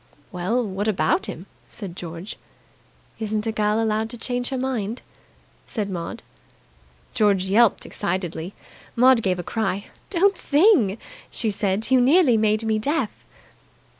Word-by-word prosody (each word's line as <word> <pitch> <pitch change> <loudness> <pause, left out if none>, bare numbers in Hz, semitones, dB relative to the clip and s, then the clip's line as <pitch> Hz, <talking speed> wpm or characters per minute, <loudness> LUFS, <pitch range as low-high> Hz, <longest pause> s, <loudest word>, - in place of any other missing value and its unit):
"Well, 205 +8 -1
what 200 +1 -3
about 300 - +1
him?" - - -7 0.2
said 190 -6 -7
George. 170 +2 -7 0.8
"Isn't 215 -1 -2
a 225 - 0
girl 215 0 +1
allowed 220 0 0
to 240 - -6
change 245 +1 -2
her 265 - -2
mind?" 245 -4 -3 0.6
said 210 -4 -3
Maud. 175 +5 -5 0.9
George 205 -5 +3
yelped 205 +3 +3
excitedly. 175 0 -3 0.4
Maud 255 0 +5
gave 185 -3 0
a 175 - -4
cry. 200 0 -2 0.2
"Don't 390 +1 +2
sing!" 285 - +4 0.3
she 220 - 0
said. 200 +3 -1
"You 260 -1 +6
nearly 275 0 +5
made 215 0 +2
me 220 -1 +1
deaf." 275 -1 0
220 Hz, 135 wpm, -23 LUFS, 195-245 Hz, 0.9 s, You